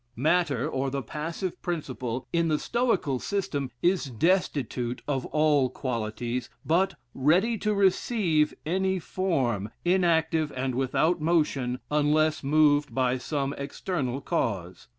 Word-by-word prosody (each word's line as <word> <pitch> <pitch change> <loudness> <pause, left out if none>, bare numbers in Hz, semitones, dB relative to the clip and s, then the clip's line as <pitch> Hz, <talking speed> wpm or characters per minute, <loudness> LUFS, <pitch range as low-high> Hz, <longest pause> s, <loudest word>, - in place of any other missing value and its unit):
Matter, 150 -1 +1
or 135 -3 -1
the 135 0 -3
passive 165 - -4
principle, 130 -7 -4
in 170 -1 +2
the 155 -1 +2
Stoical 230 - 0
system, 145 -9 -2
is 180 -2 +2
destitute 130 - 0
of 135 -3 -1
all 150 -4 +3
qualities, 120 0 -3 0.2
but 180 +4 +2 0.2
ready 180 - +3
to 215 - 0
receive 190 -5 +2
any 190 +3 +1
form, 135 - -1 0.2
inactive, 165 -4 +2
and 130 0 -1
without 145 +6 +1
motion, 150 -6 +1
unless 150 +1 +2
moved 145 0 +3
by 130 -1 +1
some 140 +2 -2
external 140 -2 -3
cause. 95 -8 -2
150 Hz, 120 wpm, -27 LUFS, 130-170 Hz, 0.2 s, all